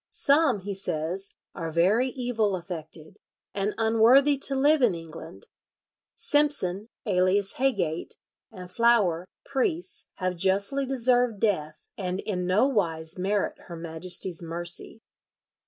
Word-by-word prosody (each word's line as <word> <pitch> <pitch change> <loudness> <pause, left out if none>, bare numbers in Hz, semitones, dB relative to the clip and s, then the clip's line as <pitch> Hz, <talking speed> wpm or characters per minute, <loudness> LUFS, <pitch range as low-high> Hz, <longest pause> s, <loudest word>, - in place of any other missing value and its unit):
"Some," 280 -7 +2
he 200 +2 -5
says, 185 +1 -2 0.2
"are 165 -1 -5
very 190 +10 +2
evil 240 -6 -1
affected, 165 -3 -8 0.4
and 200 +1 -2
unworthy 230 +6 +5
to 275 0 +3
live 290 +2 +3
in 225 -8 +3
England. 165 -1 -10 0.7
Simpson, 230 -9 +1 0.2
alias 190 0 +1
Heygate, 205 -12 -1 0.4
and 180 -4 -10
Flower, 195 -6 +2 0.2
priests, 325 +6 -2
have 185 -1 -2
justly 200 +10 +1
deserved 245 -3 +2
death, 155 -8 -1
and 185 -1 -3
in 180 -4 -3
no 190 +7 +3
wise 165 -8 -2
merit 200 +2 -1
her 170 - -7
Majesty's 170 +2 -3
mercy. 175 +6 -5
195 Hz, 120 wpm, -26 LUFS, 175-245 Hz, 0.7 s, unworthy